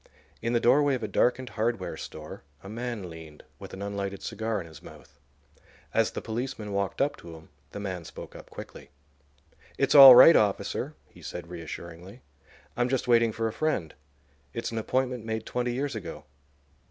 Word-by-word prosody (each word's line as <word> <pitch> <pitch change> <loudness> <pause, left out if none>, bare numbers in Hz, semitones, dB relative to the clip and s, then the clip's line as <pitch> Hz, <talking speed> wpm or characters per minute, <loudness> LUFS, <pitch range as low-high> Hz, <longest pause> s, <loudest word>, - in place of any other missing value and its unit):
In 115 +1 -1
the 120 - +3
doorway 140 +4 +4
of 120 - -5
a - - -1
darkened 125 +2 +1
hardware 110 -2 -2
store 75 0 -9 0.2
a - - -10
man 115 -3 -5
leaned, 80 -2 -12 0.2
with - - -10
an 95 - -7
unlighted 100 -1 -4
cigar 110 0 -3
in - - -7
his 80 -2 -13
mouth. 75 - -15 0.7
As - - +2
the - - -7
policeman 110 -2 -4
walked 100 -1 -2
up 145 +1 +1
to 85 -1 -11
him 80 0 -15 0.2
the - - -7
man 95 -4 -5
spoke - - -10
up - - -12
quickly. 70 - -11 0.9
"It's - - +2
all 135 -3 +12
right, 160 +6 +9
officer," 105 -2 0
he - - -18
said, 90 0 -8
reassuringly. 85 - -9 0.5
"I'm 120 +1 0
just 130 -1 -1
waiting 115 -1 +4
for 115 +1 -2
a 110 - -4
friend. 140 - -1 0.6
It's 115 0 -3
an 115 - -2
appointment 125 +1 -1
made 110 0 -4
twenty 125 0 -2
years 135 +3 -2
ago. 110 - -7
110 Hz, 175 wpm, -27 LUFS, 95-125 Hz, 0.9 s, all